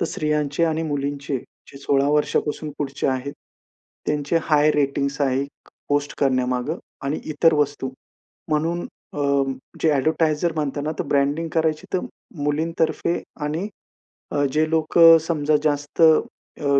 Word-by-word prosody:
तर -, -, +2 dB
स्त्रियांचे 150 Hz, 0 st, 0 dB
आणि 160 Hz, 0 st, 0 dB
मुलींचे. 140 Hz, -2 st, -2 dB
जे 140 Hz, -, -16 dB
16 140 Hz, 0 st, +1 dB
वर्षापासून 150 Hz, +1 st, 0 dB
पुढचे 140 Hz, -1 st, -2 dB
आहेत. 130 Hz, +1 st, -1 dB, 0.7 s
त्यांचे 150 Hz, +2 st, +1 dB
हाय 150 Hz, -1 st, +4 dB
रेटिंग्स 140 Hz, -1 st, 0 dB
आहे. 135 Hz, -1 st, +1 dB, 0.4 s
पोस्ट 145 Hz, 0 st, 0 dB
करण्यामागं 130 Hz, +3 st, 0 dB, 0.2 s
आणि 140 Hz, +2 st, -2 dB
इतर 160 Hz, +2 st, +4 dB
वस्तू. 145 Hz, -2 st, 0 dB, 0.6 s
म्हणून 165 Hz, +3 st, 0 dB, 0.3 s
अ, -, -, -5 dB, 0.6 s
जे 160 Hz, -, +3 dB
एडव्हर्टायझर 155 Hz, +3 st, +1 dB
म्हणताना, 150 Hz, 0 st, -2 dB
तर -, -, +1 dB
ब्रँडिंग 145 Hz, +4 st, +1 dB
करायची 160 Hz, -2 st, 0 dB
तर 185 Hz, -, +1 dB, 0.4 s
मुलींतर्फे 160 Hz, +3 st, 0 dB, 0.2 s
आणि 155 Hz, +6 st, -2 dB, 0.7 s
अ, 145 Hz, -, +1 dB
जे 155 Hz, +1 st, +2 dB
लोकं 165 Hz, +1 st, +6 dB
समजा 155 Hz, -2 st, +1 dB
जास्त 145 Hz, +1 st, -1 dB
अ, 160 Hz, -2 st, +2 dB
150 Hz, 125 wpm, -22 LUFS, 140-160 Hz, 0.7 s, लोकं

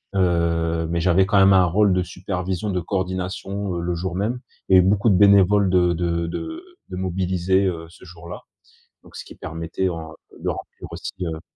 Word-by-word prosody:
Heu, 85 Hz, -3 st, +1 dB
mais 85 Hz, 0 st, -1 dB
j'avais 90 Hz, +2 st, +3 dB
quand 100 Hz, 0 st, +2 dB
même 95 Hz, 0 st, +6 dB
un 95 Hz, -, +6 dB
rôle 100 Hz, +3 st, +3 dB
de 90 Hz, 0 st, +1 dB
supervision, 95 Hz, +2 st, -4 dB
de 90 Hz, -1 st, -1 dB
coordination, 95 Hz, +1 st, -3 dB
heu, 85 Hz, -, -3 dB
le 85 Hz, 0 st, -2 dB
jour 90 Hz, +1 st, -4 dB
même. 110 Hz, +6 st, -1 dB, 0.3 s
Il 95 Hz, -, +6 dB
y -, -, +8 dB
avait 90 Hz, -, +3 dB
beaucoup 100 Hz, +3 st, +3 dB
de 100 Hz, -, +4 dB
bénévoles 100 Hz, 0 st, +5 dB
de 90 Hz, -1 st, +3 dB
de 85 Hz, 0 st, -1 dB
de 325 Hz, -, -5 dB, 0.3 s
de -, -, -6 dB
mobilisés, 95 Hz, +1 st, 0 dB
heu, 85 Hz, -2 st, -3 dB
ce 85 Hz, -, -18 dB
jour-là, 85 Hz, 0 st, -10 dB, 0.6 s
donc -, -, -17 dB
ce -, -, -8 dB
qui -, -, -12 dB
permettait 85 Hz, +3 st, -3 dB
en 80 Hz, -2 st, -6 dB, 0.3 s
de -, -, -2 dB
remplir -, -, -7 dB
aussi, -, -, -6 dB, 0.2 s
heu 80 Hz, -1 st, -5 dB
90 Hz, 195 wpm, -22 LUFS, 85-95 Hz, 0.6 s, y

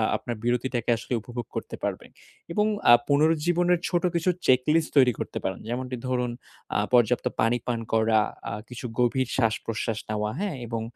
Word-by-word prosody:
আপনার 120 Hz, -, -4 dB
বিরতিটাকে 120 Hz, 0 st, -1 dB
আসলে 125 Hz, -, -5 dB
উপভোগ 120 Hz, 0 st, -6 dB
করতে -, -, -4 dB
পারবেন। -, -, -3 dB, 0.4 s
এবং 210 Hz, +4 st, +2 dB, 0.3 s
আ -, -, +11 dB
পুনরুজ্জীবনের 165 Hz, +4 st, +3 dB
ছোট 175 Hz, -2 st, 0 dB
কিছু 170 Hz, +2 st, +1 dB, 0.2 s
চেকলিস্ট 150 Hz, +6 st, +3 dB
তৈরি 125 Hz, -2 st, +6 dB
করতে -, -, -4 dB
পারেন। -, -, -2 dB
যেমনটি 125 Hz, +1 st, -3 dB
ধরুন 125 Hz, -1 st, 0 dB, 0.4 s
আ -, -, +4 dB, 0.2 s
পর্যাপ্ত 120 Hz, 0 st, +4 dB, 0.2 s
পানি 115 Hz, +2 st, +3 dB
পান 120 Hz, -2 st, 0 dB
করা, 110 Hz, 0 st, +4 dB, 0.3 s
আ -, -, -5 dB, 0.2 s
কিছু 125 Hz, +1 st, -7 dB
গভীর 125 Hz, +1 st, +2 dB
শ্বাসপ্রশ্বাস 115 Hz, -1 st, -1 dB
নেওয়া 105 Hz, 0 st, -1 dB
হ্যাঁ? 200 Hz, -5 st, -2 dB
এবং 115 Hz, -1 st, -3 dB
125 Hz, 160 wpm, -26 LUFS, 115-150 Hz, 0.4 s, আ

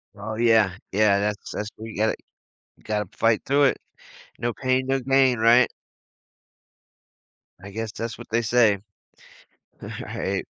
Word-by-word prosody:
Oh, 110 Hz, +2 st, -6 dB
yeah. 110 Hz, -5 st, +3 dB
Yeah, 100 Hz, 0 st, +3 dB
that's 105 Hz, 0 st, -3 dB
that's 105 Hz, 0 st, -4 dB
what 110 Hz, +1 st, -8 dB
you -, -, -9 dB
gotta 110 Hz, +1 st, +1 dB, 0.6 s
you -, -, -26 dB
gotta 105 Hz, -3 st, -2 dB
fight 115 Hz, -1 st, +2 dB
through 140 Hz, +1 st, +3 dB
it. 135 Hz, -, +2 dB, 0.6 s
No 120 Hz, -1 st, -1 dB
pain, 130 Hz, -1 st, 0 dB
no 135 Hz, 0 st, +1 dB
gain, 130 Hz, -1 st, +3 dB
right? 120 Hz, +2 st, +6 dB, 2.0 s
I 100 Hz, -, -9 dB
guess 110 Hz, +1 st, -4 dB
that's 115 Hz, 0 st, -5 dB
what -, -, -11 dB
they 115 Hz, +1 st, +2 dB
say. 110 Hz, -3 st, +3 dB, 1.0 s
Right. -, -, -4 dB
115 Hz, 140 wpm, -24 LUFS, 105-125 Hz, 2.0 s, right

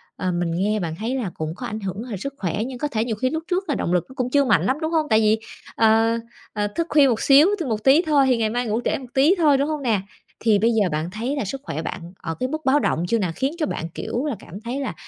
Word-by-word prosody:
ờ, 185 Hz, -, -2 dB
mình 175 Hz, -1 st, -1 dB
nghe 210 Hz, +4 st, 0 dB
bạn 165 Hz, -4 st, -3 dB
thấy 225 Hz, +8 st, -3 dB
là 220 Hz, -9 st, -2 dB
cũng 155 Hz, 0 st, -4 dB
có 250 Hz, -, -7 dB
ảnh 215 Hz, -, -5 dB
hưởng 195 Hz, +2 st, -4 dB
h 245 Hz, -, -7 dB
sức 275 Hz, +7 st, -5 dB
khỏe 175 Hz, -4 st, -2 dB
nhưng 260 Hz, -2 st, -7 dB
có 295 Hz, -, -1 dB
thể 225 Hz, -4 st, -1 dB
nhiều 225 Hz, -3 st, -2 dB
khi 255 Hz, +5 st, 0 dB
lúc 320 Hz, +3 st, -3 dB
trước 370 Hz, 0 st, -1 dB
là 290 Hz, -, +1 dB
động 175 Hz, -, -1 dB
lực 180 Hz, -, +1 dB
nó -, -, -11 dB
cũng 250 Hz, -1 st, -1 dB
chưa 280 Hz, +2 st, +3 dB
mạnh 200 Hz, -8 st, +3 dB
lắm, 265 Hz, +8 st, 0 dB
đúng 315 Hz, -, -1 dB
hông? 315 Hz, -2 st, +1 dB
Tại 220 Hz, -, +5 dB
vì, 220 Hz, 0 st, +3 dB, 0.4 s
ờ, 225 Hz, +1 st, +4 dB, 0.4 s
ờ, 210 Hz, -1 st, 0 dB
thức 330 Hz, +11 st, -3 dB
khuya 290 Hz, -2 st, +5 dB
một 235 Hz, -4 st, 0 dB
xíu 285 Hz, +4 st, +6 dB
thôi, 305 Hz, -, -3 dB
một 215 Hz, -1 st, -2 dB
tí 275 Hz, +5 st, +6 dB
thôi 300 Hz, -5 st, +3 dB
thì 250 Hz, -2 st, +3 dB
ngày 220 Hz, -1 st, +1 dB
mai 245 Hz, +2 st, -1 dB
ngủ 220 Hz, +3 st, 0 dB
trễ -, -, +1 dB
một 260 Hz, -, -10 dB
tí 290 Hz, +8 st, +4 dB
thôi, 300 Hz, -4 st, +4 dB
đúng 280 Hz, +2 st, +1 dB
hông 305 Hz, -2 st, -2 dB
nè? 220 Hz, -6 st, +1 dB, 0.4 s
Thì 215 Hz, -3 st, +3 dB
bây 225 Hz, -, +3 dB
giờ 210 Hz, -5 st, +2 dB
bạn 155 Hz, +3 st, -2 dB
thấy 235 Hz, +7 st, -3 dB
là 275 Hz, -, -2 dB
sức 270 Hz, +7 st, -5 dB
khỏe 160 Hz, -, -4 dB
bạn 170 Hz, +1 st, -6 dB
ở 165 Hz, -1 st, -5 dB
cái 255 Hz, 0 st, -1 dB
mức 310 Hz, 0 st, -5 dB
báo 270 Hz, +2 st, +4 dB
động 170 Hz, -, 0 dB
chưa 230 Hz, +5 st, +1 dB
nà? 185 Hz, -5 st, -1 dB
Khiến 270 Hz, +2 st, 0 dB
cho 315 Hz, -, 0 dB
bạn, 165 Hz, -, -4 dB
kiểu 240 Hz, -, -4 dB
là, 290 Hz, -5 st, -1 dB
cảm 190 Hz, +5 st, -10 dB
thấy 240 Hz, +4 st, -4 dB
là 275 Hz, -, -3 dB
230 Hz, 305 wpm, -22 LUFS, 205-275 Hz, 0.4 s, xíu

